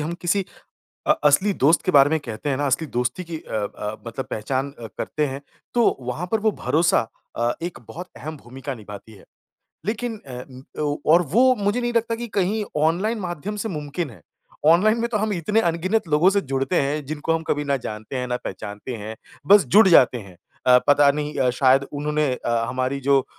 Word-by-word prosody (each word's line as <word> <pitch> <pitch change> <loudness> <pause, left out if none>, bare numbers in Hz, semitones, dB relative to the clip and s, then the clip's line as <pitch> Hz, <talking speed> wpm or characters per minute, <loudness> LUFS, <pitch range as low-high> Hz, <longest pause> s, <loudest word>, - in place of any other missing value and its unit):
हम 155 +3 -3
किसी 190 +3 +1 0.6
अ, - - +2
असली 185 +8 +4
दोस्त 160 +2 +5
के - - +2
बारे 140 +1 +6
में 160 - +2
कहते 115 +2 -6
हैं 135 - +1
ना, 145 - -1
असली 140 +4 0
दोस्ती 125 +9 -1
की 165 -1 -6
अ - - -13 0.3
अ, 105 +1 -4
मतलब 115 +3 -5
पहचान 130 +6 -2
अ, 115 - -7
करते 150 -1 -1
हैं। 135 0 -5 0.3
तो 240 -1 +3
वहाँ 125 +8 -4
पर 220 - +2
वो 220 +1 +3
भरोसा 165 +2 +3 0.4
अ, 120 +1 +1
एक 175 +1 -4
बहुत 180 +2 -8
अहम 155 +1 -7
भूमिका 135 +1 -7
निभाती 105 0 -11
है। 100 - -16 0.6
लेकिन 230 +2 -2
अ, 130 +1 -10
ओ 145 -1 0 0.2
और 170 +2 +6
वो 255 +5 +5
मुझे 205 +4 0
नहीं 240 0 -1
लगता 230 0 +1
कि 235 +1 -6
कहीं 205 +3 +1 0.2
ऑनलाइन 190 +9 +1
माध्यम 180 +3 -4
से - - -2
मुमकिन 150 - -4
है। 110 - -15 0.5
ऑनलाइन 200 +8 +5
में 235 - 0
तो - - +2
हम 215 0 0
इतने 205 +5 +1
अनगिनत 175 +4 0
लोगों 155 +5 +4
से 200 0 +2
जुड़ते 135 +1 0
हैं 145 +2 -1
जिनको 155 +2 -2
हम 165 0 0
कभी 145 0 0
ना 140 -1 +1
जानते 110 0 -6
हैं, 125 0 -2
ना 125 - 0
पहचानते 105 +5 -6
हैं, 110 +1 -7 0.3
बस 205 +3 +7
जुड़ 215 +1 +8
जाते 130 -7 +6
हैं। 95 -5 -12 0.3
अ, 125 -1 +7
पता 145 0 +6
नहीं 150 +1 -4
अ, 130 - +3
शायद 130 +2 +4
उन्होंने 150 -1 0
अ, 120 -2 -1
हमारी 130 +2 -2
जो 140 +1 +4
उम, - - -10
150 Hz, 210 wpm, -23 LUFS, 130-185 Hz, 0.6 s, जुड़